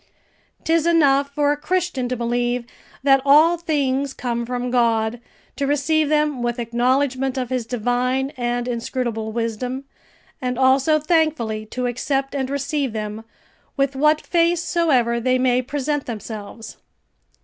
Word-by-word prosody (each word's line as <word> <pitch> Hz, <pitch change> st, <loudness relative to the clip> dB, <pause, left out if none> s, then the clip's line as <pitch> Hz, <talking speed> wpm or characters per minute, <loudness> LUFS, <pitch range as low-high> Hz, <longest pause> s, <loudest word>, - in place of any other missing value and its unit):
'Tis 330 Hz, 0 st, +2 dB
enough 285 Hz, -4 st, +4 dB
for 290 Hz, 0 st, +1 dB
a -, -, +1 dB
Christian 305 Hz, -4 st, -1 dB
to 255 Hz, -, -1 dB
believe 240 Hz, +1 st, -1 dB, 0.4 s
that 270 Hz, -1 st, +5 dB
all 305 Hz, +5 st, +6 dB
things 280 Hz, -5 st, -1 dB
come 235 Hz, -1 st, -3 dB
from 250 Hz, 0 st, -3 dB
God, 230 Hz, -1 st, +1 dB, 0.4 s
to 280 Hz, -, -1 dB
receive 295 Hz, +2 st, +1 dB
them 300 Hz, -4 st, +1 dB
with 240 Hz, 0 st, -1 dB
acknowledgment 255 Hz, +3 st, 0 dB
of 255 Hz, -1 st, -3 dB
His 250 Hz, -3 st, -2 dB
divine 250 Hz, +3 st, 0 dB
and 240 Hz, 0 st, -2 dB
inscrutable 235 Hz, -2 st, -3 dB
wisdom, 235 Hz, +3 st, -3 dB, 0.6 s
and 250 Hz, -1 st, -2 dB
also 265 Hz, +4 st, +4 dB
thankfully 305 Hz, -9 st, 0 dB
to 250 Hz, +3 st, -3 dB
accept 270 Hz, +3 st, -1 dB
and 265 Hz, -2 st, -2 dB
receive 280 Hz, -2 st, -2 dB
them, 215 Hz, 0 st, -5 dB, 0.5 s
with 275 Hz, 0 st, +1 dB
what 300 Hz, +3 st, +3 dB
face 340 Hz, 0 st, +2 dB
soever 265 Hz, -10 st, +2 dB
they 255 Hz, +2 st, +2 dB
may 255 Hz, -1 st, +2 dB
present 290 Hz, +2 st, -3 dB
themselves. 220 Hz, -1 st, -7 dB
260 Hz, 140 wpm, -21 LUFS, 240-290 Hz, 0.6 s, all